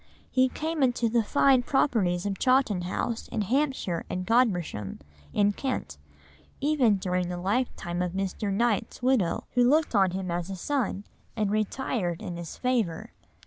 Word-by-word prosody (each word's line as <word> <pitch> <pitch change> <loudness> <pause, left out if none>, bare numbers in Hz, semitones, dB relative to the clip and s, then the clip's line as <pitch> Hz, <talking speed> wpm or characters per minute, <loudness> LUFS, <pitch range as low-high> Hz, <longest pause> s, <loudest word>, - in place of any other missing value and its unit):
He 260 0 +3
came 315 +3 -3
into 245 -3 +2
the 235 +1 +3
fine 265 +3 +4
properties 205 -9 +1
of 200 -1 -2
Chawton 255 -8 +3
House 225 +5 -3
in - - -2
Hampshire 260 - 0
and 185 0 -3
Godmersham 180 - +1 0.3
in 205 0 +3
Kent, 260 +5 -4 0.6
even 275 -7 +3
during 180 -2 -1
the 180 - -3
lifetime 185 -3 -1
of 180 -1 -2
Mr. 195 +1 -2
Knight's 225 +2 0
widow, 250 -9 +2
who 245 0 +4
looked 305 0 +2
on 195 -3 +4
him 185 0 -4
as 175 +1 -2
a 195 - -4
son 215 -1 -2 0.3
and 210 -3 0
retired 215 -4 -1
in 175 - -6
his 170 -1 -7
favour. 230 -10 -1
210 Hz, 155 wpm, -27 LUFS, 180-255 Hz, 0.6 s, fine